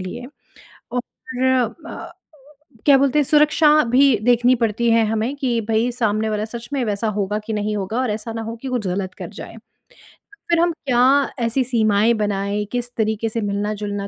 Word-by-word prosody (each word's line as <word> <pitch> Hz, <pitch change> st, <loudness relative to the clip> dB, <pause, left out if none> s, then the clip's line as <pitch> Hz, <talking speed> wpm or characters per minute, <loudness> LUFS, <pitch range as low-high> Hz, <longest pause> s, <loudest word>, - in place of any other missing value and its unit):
लिए 185 Hz, +7 st, -6 dB, 0.7 s
और 250 Hz, -, 0 dB
फ़िर 260 Hz, +1 st, -2 dB, 0.4 s
अ, -, -, -8 dB, 0.7 s
क्या 280 Hz, -2 st, +7 dB
बोलते 275 Hz, +2 st, +2 dB
हैं 295 Hz, -, +4 dB
सुरक्षा 300 Hz, +2 st, +4 dB, 0.2 s
भी 265 Hz, -1 st, +5 dB
देखनी 245 Hz, +1 st, +4 dB
पड़ती 230 Hz, 0 st, 0 dB
है 225 Hz, -1 st, +4 dB
हमें 225 Hz, +5 st, -1 dB
कि 255 Hz, -5 st, -1 dB
भई, 225 Hz, +2 st, +1 dB
सामने 220 Hz, -2 st, 0 dB
वाला 210 Hz, 0 st, -2 dB
सच 235 Hz, +1 st, -8 dB
में 270 Hz, -, 0 dB
वैसा 210 Hz, +1 st, -2 dB
होगा 205 Hz, +1 st, -1 dB
कि 220 Hz, -, -4 dB
नहीं 210 Hz, 0 st, -2 dB
होगा 205 Hz, +5 st, -3 dB
और 250 Hz, -4 st, -1 dB
ऐसा 220 Hz, +2 st, -5 dB
ना 225 Hz, -, -4 dB
हो 225 Hz, +1 st, -5 dB
कि 270 Hz, -, -6 dB
कुछ 240 Hz, -6 st, -2 dB
ग़लत 185 Hz, +1 st, -3 dB
कर -, -, -8 dB
जाए, -, -, -10 dB
तो -, -, -19 dB, 0.7 s
फ़िर 340 Hz, -, +3 dB
हम 345 Hz, +1 st, +3 dB
क्या 245 Hz, -3 st, +1 dB, 0.5 s
ऐसी 235 Hz, +3 st, +1 dB
सीमाएँ 220 Hz, -2 st, +2 dB
बनाएँ 205 Hz, 0 st, -1 dB
किस 245 Hz, 0 st, -2 dB
तरीक़े 220 Hz, 0 st, 0 dB
से 230 Hz, +1 st, -3 dB
मिलना-जुलना 205 Hz, 0 st, -3 dB
225 Hz, 190 wpm, -20 LUFS, 210-250 Hz, 0.7 s, क्या